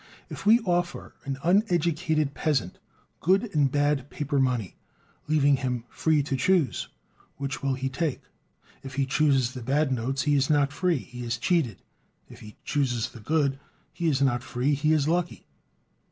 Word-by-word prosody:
If -, -, -6 dB
we 230 Hz, +3 st, +6 dB
offer 175 Hz, -3 st, -2 dB
an 135 Hz, -1 st, -3 dB
uneducated 170 Hz, -6 st, +1 dB
peasant 135 Hz, -, -1 dB, 0.4 s
good 195 Hz, +5 st, +1 dB
and 145 Hz, -4 st, +2 dB
bad 145 Hz, -1 st, +1 dB
paper 145 Hz, -1 st, -2 dB
money, 125 Hz, -7 st, 0 dB, 0.5 s
leaving 145 Hz, -2 st, +3 dB
him 125 Hz, -3 st, -2 dB
"free 155 Hz, -3 st, +1 dB
to 135 Hz, -1 st, -2 dB
choose" 145 Hz, -1 st, +1 dB, 0.5 s
which 140 Hz, 0 st, -3 dB
he 140 Hz, -, -4 dB
will 135 Hz, -1 st, 0 dB
take, 135 Hz, +3 st, -2 dB, 0.6 s
and 135 Hz, -, -8 dB
he 135 Hz, +1 st, 0 dB
chooses 135 Hz, -3 st, +2 dB
the 125 Hz, -, -7 dB
bad 140 Hz, +4 st, +1 dB
notes, 130 Hz, +2 st, -1 dB
he 150 Hz, -, +2 dB
is 135 Hz, -1 st, +2 dB
not 145 Hz, -2 st, +2 dB
free, 180 Hz, +1 st, +1 dB
he 125 Hz, -1 st, -8 dB
is 120 Hz, 0 st, -2 dB
cheated; 130 Hz, -, 0 dB, 0.4 s
if -, -, -14 dB
he 105 Hz, 0 st, -12 dB
chooses 120 Hz, -5 st, 0 dB
the 115 Hz, -, -12 dB
good, 140 Hz, +3 st, 0 dB, 0.3 s
he 170 Hz, -, -2 dB
is 140 Hz, -3 st, +2 dB
not 120 Hz, -3 st, +1 dB
free, 130 Hz, +3 st, -1 dB
he 150 Hz, +2 st, +1 dB
is 155 Hz, -2 st, +2 dB
lucky. 175 Hz, +1 st, -1 dB
140 Hz, 170 wpm, -26 LUFS, 130-155 Hz, 0.6 s, we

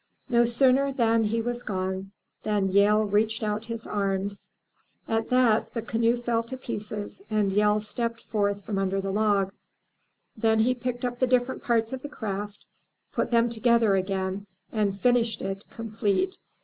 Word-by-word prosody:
'* -, -, -39 dB
No 240 Hz, -1 st, +4 dB
sooner 260 Hz, +3 st, +4 dB
was 230 Hz, -4 st, +2 dB, 0.3 s
he -, -, -19 dB
gone, 190 Hz, 0 st, -3 dB, 0.3 s
than 205 Hz, -2 st, 0 dB
Yehl 210 Hz, +2 st, +4 dB
stretched 215 Hz, +2 st, +1 dB
out 210 Hz, +1 st, -2 dB
his 230 Hz, 0 st, -6 dB
arms. 200 Hz, 0 st, -2 dB, 0.6 s
At 225 Hz, 0 st, -1 dB
that, 250 Hz, -3 st, +3 dB
the 230 Hz, -, -2 dB
canoe 230 Hz, +1 st, +1 dB
fell 235 Hz, -1 st, 0 dB
to 230 Hz, +3 st, -7 dB
pieces 210 Hz, -5 st, -6 dB
and 210 Hz, -2 st, +1 dB
Yehl 210 Hz, +1 st, +3 dB
stepped 230 Hz, +2 st, -3 dB
forth 200 Hz, -2 st, -1 dB
from 200 Hz, -3 st, -2 dB
under 195 Hz, 0 st, 0 dB
the 195 Hz, 0 st, -2 dB
log. 200 Hz, -2 st, +1 dB, 0.8 s
Then 220 Hz, 0 st, +2 dB
he 250 Hz, +3 st, +3 dB
picked 250 Hz, 0 st, -3 dB
up 245 Hz, 0 st, -3 dB
the 255 Hz, -, +3 dB
different 250 Hz, +1 st, +1 dB
parts 230 Hz, 0 st, +1 dB
of 260 Hz, -, -4 dB
the 290 Hz, -, -6 dB
craft, 205 Hz, -5 st, -5 dB, 0.5 s
put -, -, 0 dB
them 235 Hz, 0 st, +4 dB
together 235 Hz, -2 st, +3 dB
again, 190 Hz, +1 st, -2 dB, 0.2 s
and 205 Hz, -3 st, 0 dB
finished 240 Hz, -1 st, +2 dB
it, 195 Hz, +1 st, -4 dB
complete. 225 Hz, -, -1 dB
220 Hz, 160 wpm, -27 LUFS, 200-235 Hz, 0.8 s, No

